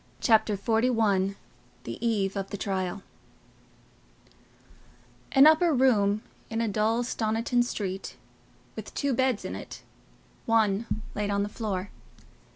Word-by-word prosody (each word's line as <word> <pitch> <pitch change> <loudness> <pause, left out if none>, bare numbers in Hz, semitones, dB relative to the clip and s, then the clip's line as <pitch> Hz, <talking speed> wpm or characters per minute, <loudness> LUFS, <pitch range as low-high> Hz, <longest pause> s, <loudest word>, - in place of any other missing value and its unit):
Chapter 220 -2 +3
XLI 220 -3 +1 0.5
The - - -7
Eve 205 -4 0
of 195 -1 -3
the 205 - -5
Trial 190 -1 -3 2.3
An 270 +1 +7
upper 315 +2 +6
room 215 -5 +3 0.3
in 225 - -2
a 230 - +1
dull 220 +3 +1
Stoniton 230 +1 0
street, 195 -5 -4 0.6
with - - -8
two 280 -2 0
beds 260 -2 +1
in - - -4
it—one 225 -1 -3 0.3
laid 205 0 -2
on 200 0 +1
the 205 - -3
floor. 205 -3 -4
215 Hz, 115 wpm, -27 LUFS, 200-235 Hz, 2.3 s, An